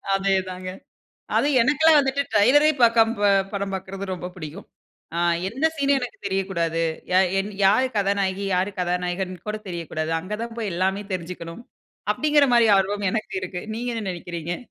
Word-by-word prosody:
அதேதாங்க. 185 -1 -1 0.7
அது 285 - +3
எனக்கெல்லாம் 300 +4 +5
வந்துட்டு 275 0 0
ட்ரைலரே, 270 +9 +5
பாக்காம, 230 0 +5
ப - - +1 0.3
படம் 200 -1 -3
பாக்கறது 190 +1 -5
ரொம்ப 180 0 -6
புடிக்கும். 165 +3 -8 0.5
ஆ - - 0 0.3
எந்த 270 +9 0
சீனும் 280 -1 +2
எனக்கு 245 -1 -6
தெரியக்கூடாது. 175 -4 -1 0.3
யா 185 - +6 0.4
யாரு 215 +7 +5
கதாநாயகி, 200 -1 0
யாரு 185 +3 +1
கதாநாயகன்னு 180 0 -2
கூட 215 0 -2
தெரியக்கூடாது. 165 -2 -4
அங்க 185 +5 -5
தான் 235 -1 -6
போயி 210 -5 -2
எல்லாமே 190 +3 0
தெரிஞ்சுக்கணும், 170 +3 -6 0.5
அப்டிங்கிற 295 -2 +3
மாரி 235 -2 +5
ஆர்வம் 200 +1 0
எனக்கு 215 -3 -3
இருக்கு. 180 -1 -5
நீங்க 240 +1 -3
என்ன 225 -2 -4
நெனைக்கிறீங்க? 175 -1 -5
195 Hz, 145 wpm, -23 LUFS, 180-230 Hz, 0.7 s, யா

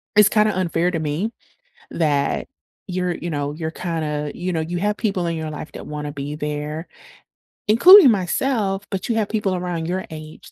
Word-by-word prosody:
it's 210 -1 +7
kinda 215 -2 +2
unfair 175 -1 +1
to 165 - -2
me 155 +9 -2 0.6
that 145 -4 0 0.4
you're 180 -1 -1
you 175 - -5
know, 145 -1 -2
you're 160 0 -4
kinda, 150 -4 -3
you 180 +1 -3
know, 160 - 0
you 170 +3 -3
have 210 +2 0
people 195 -6 -1
in 170 - -1
your 160 -1 -4
life 150 +1 -7
that - - -9
wanna 150 -1 -5
be 145 +1 -5
there, 150 +2 -4 0.8
including 320 - +9
myself, 200 +1 0
but 195 - -3
you 230 - +1
have 215 -2 0
people 205 -4 0
around 175 -2 -3
your 185 +1 -2
age 155 0 -10
175 Hz, 185 wpm, -21 LUFS, 155-200 Hz, 0.8 s, including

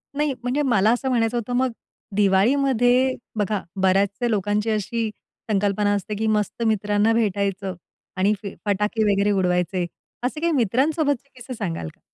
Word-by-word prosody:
नाही, 295 -1 +1
म्हणजे 250 +4 0
मला 220 -6 +3
असं 265 +2 -2
म्हणायचं 235 -1 +1
होतं, 240 +1 -3
मग 255 +1 +1 0.4
दिवाळीमध्ये 245 +5 +3 0.2
बघा, 205 -1 0 0.2
बऱ्याचशा 195 +5 +2
लोकांची 210 0 0
अशी 220 +1 -1 0.4
संकल्पना 205 0 +1
असते 205 +1 -2
की 220 - 0
मस्त 215 +1 0
मित्रांना 210 +1 +2
भेटायचं 200 -3 -1 0.4
आणि 195 +3 +3
फ - - -4 0.2
फटाके 210 +2 +1
वगैरे 200 +1 +2
उडवायचे. 180 -1 +1 0.4
असे 260 +5 -2
काही 340 0 +2
मित्रांसोबतचे 280 - +1
किस्से 255 +1 -8
सांगाल 175 - -4
का? - - -37
215 Hz, 145 wpm, -23 LUFS, 200-245 Hz, 0.4 s, मला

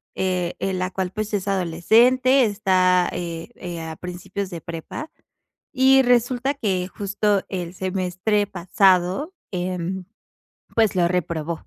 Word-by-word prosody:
eh, 180 -2 -1
eh, 195 - -1
la 185 0 -2
cual 185 -1 -3
pues, 215 +1 -4
es 200 -3 -1
adolescente, 230 +9 +4
está, 185 -4 +2
eh, 170 -2 -5
eh, 175 -2 -6
a 160 -1 -6
principios 180 +2 -5
de 170 -3 -7
prepa, 170 - -7 0.6
y 265 0 +5
resulta 245 +2 +2
que 190 -9 -1
justo 200 +1 0
el 180 -3 -4
semestre 190 +2 -1
pasado, 190 - +2 0.2
em, 180 0 -3 0.7
pues, 220 -3 +3
lo 175 -1 +3
reprobó. 170 -2 -3
185 Hz, 130 wpm, -23 LUFS, 180-215 Hz, 0.7 s, y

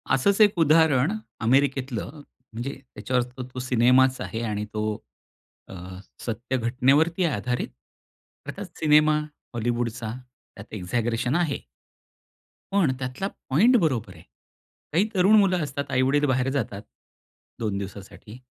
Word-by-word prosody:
असंच 195 - +2
एक 210 -1 +6
उदाहरण 155 -2 +4 0.3
अमेरिकेतलं 135 -1 +1 0.4
म्हणजे 120 +5 -4 0.2
त्याच्यावर 125 -1 0 0.3
तो 125 - -5
सिनेमाच 130 +1 +3
आहे 115 - -4
आणि 105 0 -2
तो 105 0 -2 0.9
अ, - - -9 0.5
सत्य 120 +3 -2
घटनेवरती 135 +9 +2
आधारित. 125 -4 -1 0.8
अर्थात - - -6
सिनेमा 150 0 +5 0.4
हॉलीवूडचा, 115 -1 -2 0.4
त्यात 100 0 -12
एक्साग्रेशन 115 +6 -1
आहे. 170 -5 0 1.1
पण 195 -8 +3
त्यातला 130 +8 -3 0.2
पॉइंट 210 - +5
बरोबर 125 - 0
आहे. 85 - -15 0.7
काही 185 +7 +3
तरुण 190 +3 +5
मुलं 185 -4 +2
असतात, 140 -1 -4
आई-वडील 135 +3 +2
बाहेर 130 -1 +1
जातात. 115 -7 -3 0.8
2 105 -3 -2
दिवसासाठी, 100 +3 -9
130 Hz, 115 wpm, -25 LUFS, 115-150 Hz, 1.1 s, एक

